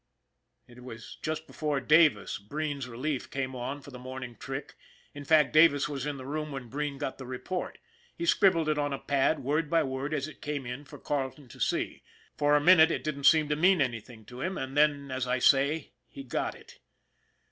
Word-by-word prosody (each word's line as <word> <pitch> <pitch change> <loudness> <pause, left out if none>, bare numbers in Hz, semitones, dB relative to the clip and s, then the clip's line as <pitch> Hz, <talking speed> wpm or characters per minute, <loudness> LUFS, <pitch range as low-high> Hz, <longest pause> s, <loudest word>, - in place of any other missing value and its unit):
It 125 0 -14
was 115 -2 -10
just 155 0 -3
before 150 -3 -2
Davis, 150 +4 +3
Breen's 140 +5 -4
relief, 130 +3 -3
came 130 -1 -3
on 130 +4 -4
for 140 - -11
the 125 - -9
morning 130 -1 -7
trick, 135 +3 -6 0.4
in 145 -1 -8
fact 150 -5 +4
Davis 155 -2 +5
was 145 -1 -4
in 145 -1 -3
the 130 - -9
room, 150 +2 -4
when 135 -4 -7
Breen 145 +2 -3
got 135 -2 -4
the 130 - -7
report. 150 +8 -4 0.4
He 340 - -3
scribbled 180 - +4
it 155 -1 +1
on 145 -1 -1
a - - -2
pad, 140 +1 +1
word 150 +3 0
by 165 0 +3
word 135 +2 -3
as 140 0 -2
it 155 - -13
came 145 -2 -4
in, 125 +4 -6
for - - -11
Carleton 140 -1 -3
to - - -14
see. - - -1 0.3
For 145 0 +3
a - - +5
minute 160 +1 +7
it - - -2
didn't 140 -2 -3
seem 155 -2 +6
to 150 - +1
mean 180 +4 +4
anything 115 -4 -3
to 125 +3 -10
him, 185 +4 -2
and 130 +1 -5
then, 145 -2 +2
as 130 -1 -2
I 125 +1 +1
say, 140 +4 +3 0.2
he 135 - -10
got 125 - -2
it. - - -16
140 Hz, 210 wpm, -29 LUFS, 130-150 Hz, 0.4 s, minute